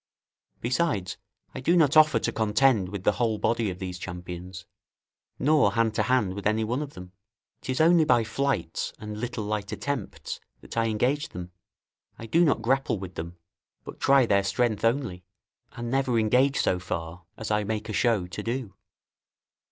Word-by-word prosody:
Besides, 120 - 0 0.4
I - - -5
do 170 +7 +3
not 155 -3 +4
offer 155 -5 +6
to - - -1
contend 110 -2 +2
with 100 -1 -6
the - - +4
whole 115 -3 0
body 115 0 0
of 90 - -5
these 90 -1 -6
champions, 90 0 -7 0.7
nor 145 -8 +3
hand 115 0 +2
to - - +1
hand 125 -7 +1
with 100 +1 -2
anyone 110 +5 0
of 145 -1 -7
them: 90 0 -10 0.5
'tis 130 0 -3
only 165 +1 +6
by 120 -6 +3
flights 110 -7 -2
and 105 -1 -7
little 120 -1 -3
light 105 -1 -3
attempts 140 -7 -4 0.2
that - - -10
I 115 0 +2
engage 125 +8 0
them; 90 0 -8 0.7
I 115 - -8
do 165 +10 +3
not 140 -8 +2
grapple 135 -1 +1
with 95 -1 -7
them, 85 +1 -7 0.5
but - - -10
try 135 -2 +5
their 100 -3 +3
strength 110 +1 0
only, 115 -7 0 0.5
and 120 0 -5
never 135 -3 +1
engage 125 +6 +3
so 90 - +1
far 85 0 -5
as 110 -1 -5
I 105 0 +2
make 110 +1 -3
a 110 - -4
show 110 -3 +2
to 90 - -6
do. 120 -4 -4
110 Hz, 175 wpm, -26 LUFS, 95-130 Hz, 0.7 s, offer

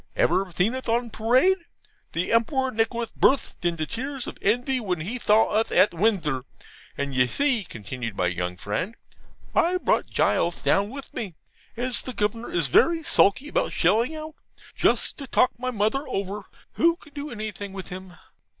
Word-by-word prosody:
Ever - - +3
theen 180 +7 +1
uth 260 -2 -5
on 235 0 +1
pawade? 255 - +3 0.6
The 170 +2 -1
Empewar 260 +3 +2
Nicolath 225 +1 -1
burtht 270 -8 +2
into 170 -2 0
tearth 260 - -4
of - - -8
envy 245 +5 +1
when 185 -8 -2
he 225 +10 -4
thaw 215 0 +4
uth 220 +1 +1
at 200 - +5
Windthor. 170 - +1 0.6
And 140 -1 -2
you 125 -1 +3
see,' 260 - +1
continued 115 -3 -6
my 90 - +1
young 90 0 -2
friend, 165 - -3 0.6
'I 355 +2 +3
brought - - +1
Gules 170 0 +1
down 200 +1 +3
with 275 +3 -9
me, 195 -8 -5 0.4
as 245 +1 -1
the 255 - -7
Governor 220 +2 -1
is 165 -5 0
very 325 - +4
sulky 270 -3 +3
about - - 0
shelling 235 +8 +2
out, 310 0 -7 0.4
just - - +1
to 275 - -6
talk 255 - +3
my 255 +1 -2
mother 235 +5 0
over, 200 -3 -3 0.3
who 335 0 +3
can 300 -4 -19
do 290 +1 -5
anything 210 -4 -5
with 190 -1 -7
him. 185 -1 -8
220 Hz, 170 wpm, -25 LUFS, 180-260 Hz, 0.6 s, at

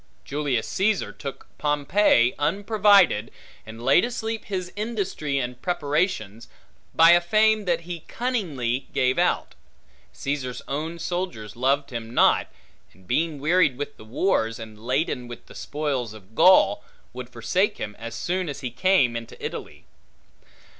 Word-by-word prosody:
Julius 140 -5 -1
Caesar 205 +1 0
took 140 -2 -8
Pompey 145 -3 +3
unprovided, 200 - +3 0.4
and 110 +1 -9
laid 135 +6 +5
asleep 225 -2 -3
his 185 -3 -4
industry 200 -10 -2
and 125 -1 -3
preparations, 150 - -1 0.5
by 165 +1 +8
a 175 0 +6
fame 215 +4 +3
that 170 -2 +1
he 170 0 -6
cunningly 150 - -2
gave 130 0 +2
out: - - +1 0.6
Caesar's 135 -3 -4
own 155 +5 -3
soldiers 170 - -4
loved 135 +4 +1
him 115 0 -6
not, - - +4 0.5
and 95 - -22
being 155 - 0
wearied 155 -3 +3
with 145 +1 -5
the - - -12
wars, 115 - 0
and 110 -2 -10
laden 125 0 -1
with 120 -1 -10
the - - -14
spoils 135 -7 -3
of 105 0 -16
Gaul, 190 - +5 0.3
would 125 0 -7
forsake 180 - 0
him, 105 - -5
as 115 0 -6
soon 180 -1 -2
as 140 0 -6
he 125 -3 -4
came 130 -2 +3
into 115 0 -7
Italy. - - -6
145 Hz, 140 wpm, -24 LUFS, 120-185 Hz, 0.6 s, by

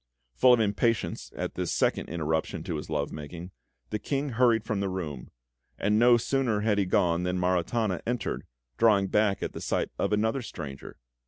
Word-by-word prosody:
Full 125 - +6
of 120 - +4
impatience 110 +1 0
at - - -3
this - - -2
second - - 0
interruption 80 -1 -2
to 80 - -3
his 75 - -7
love 75 -2 -1
making, 85 +4 -8 0.4
the 105 - -1
King 140 +6 -2
hurried 115 -2 +3
from 110 -2 -2
the 100 -1 -1
room; 80 -9 -5 0.5
and 105 +2 +2
no 120 0 +6
sooner 120 -3 0
had 105 -1 +2
he 100 - +2
gone 85 -1 +2
than 90 0 -1
Maritana 90 +3 0
entered, 120 0 -2 0.3
drawing 100 -4 +4
back 105 -2 +2
at - - -3
the - - -7
sight - - -1
of - - 0
another 110 +5 +1
stranger. 75 - -8
100 Hz, 180 wpm, -28 LUFS, 85-115 Hz, 0.5 s, Full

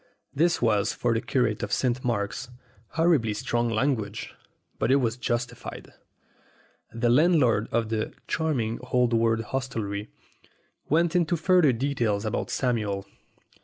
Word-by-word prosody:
This 165 -1 +2
was, 105 -3 +2
for 120 -1 0
the 115 - 0
curate 120 -3 0
of 105 - -4
St. 125 +1 0
Mark's, 115 +1 -2 0.4
horribly 160 -10 +2
strong 120 +2 -1
language; 110 -3 -1 0.5
but - - +1
it - - +6
was 120 -4 +1
justified. 120 -1 -4 1.0
The 120 +1 +1
landlord 130 - +4
of 115 -2 0
the 110 -1 -2 0.2
"charming 125 -9 -1
old 125 -1 +3
world 115 0 +2
hostelry" 110 -5 -4 0.8
went 165 +3 +2
into 175 -1 +2
further 175 -3 +4
detail 120 -4 0
about 110 - -2
Samuel. 105 -6 -1
120 Hz, 130 wpm, -26 LUFS, 110-135 Hz, 1.0 s, it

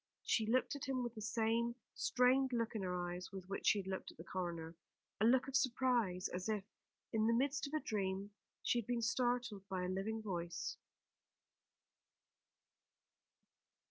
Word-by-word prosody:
She 220 -2 +2
looked 255 +3 +2
at 285 - -4
him 260 -1 0
with 240 -1 -3
the 220 - -7
same 230 +2 +1 0.2
strained 255 +1 +3
look 230 -1 0
in 220 - -2
her 180 -1 -1
eyes 180 +1 -5
with 190 -2 -7
which 195 - -3
she - - +6
had 195 - -2
looked 190 0 -3
at - - -14
the 165 - -8
coroner; 170 -2 -4 0.4
a 215 - +4
look 250 +3 +5
of 270 - -4
surprise, 240 -8 +2
as 180 +4 -3
if, 210 -2 0 0.5
in 220 0 +3
the 230 - +4
midst 280 +3 +1
of 290 - -4
a - - +3
dream, 195 -1 -1 0.3
she 240 - +3
had 230 - -5
been 240 -1 0
startled 240 -5 0
by 185 -1 -1
a - - 0
living 195 +4 -1
voice. 175 -4 -3
220 Hz, 175 wpm, -38 LUFS, 190-245 Hz, 0.5 s, she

